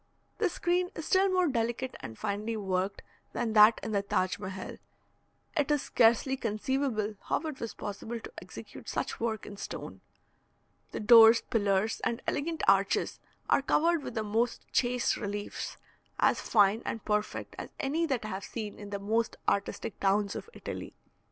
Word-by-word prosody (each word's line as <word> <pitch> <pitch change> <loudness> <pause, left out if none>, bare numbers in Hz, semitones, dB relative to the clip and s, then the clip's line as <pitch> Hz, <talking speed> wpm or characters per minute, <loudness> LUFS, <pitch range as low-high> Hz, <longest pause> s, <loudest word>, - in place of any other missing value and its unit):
This 400 -6 +1
screen 355 +1 +1
is 320 - -5
still 385 +1 +4
more 365 -1 +3
delicate 240 0 -1
and 110 -1 -8
finely 215 +2 -2
worked 190 -1 -2 0.3
than 230 -2 -1
that 215 +1 +7
in - - -3
the 200 -2 +2
Taj 185 -1 0
Mehal; 190 -1 -6 0.8
it 295 -3 +1
is 295 -2 +2
scarcely 235 +3 +3
conceivable 225 -1 -1
how - - +1
it 310 -4 -5
was 230 - -5
possible 220 +3 -5
to - - -10
execute - - -10
such - - -3
work 225 -2 -2
in 205 - -9
stone. - - -7 0.9
The - - -4
doors, 225 +1 +8
pillars, 205 0 0
and 235 - 0
elegant 320 +3 -2
arches 195 0 +3 0.3
are - - +4
covered 330 +4 +2
with - - -7
the 220 - 0
most 225 +3 -1
chaste 245 0 +1
reliefs, 205 0 -4 0.4
as - - +3
fine 210 0 +4
and 225 - -4
perfect 210 0 -2
as - - -6
any 315 +4 0
that 250 -6 -1
I - - -4
have 190 0 -4
seen 215 -3 -6
in 205 -1 -8
the 200 - -3
most 220 +3 0
artistic 200 +1 -1
towns 200 +1 +1
of - - -6
Italy. - - -7
225 Hz, 165 wpm, -30 LUFS, 205-265 Hz, 0.9 s, doors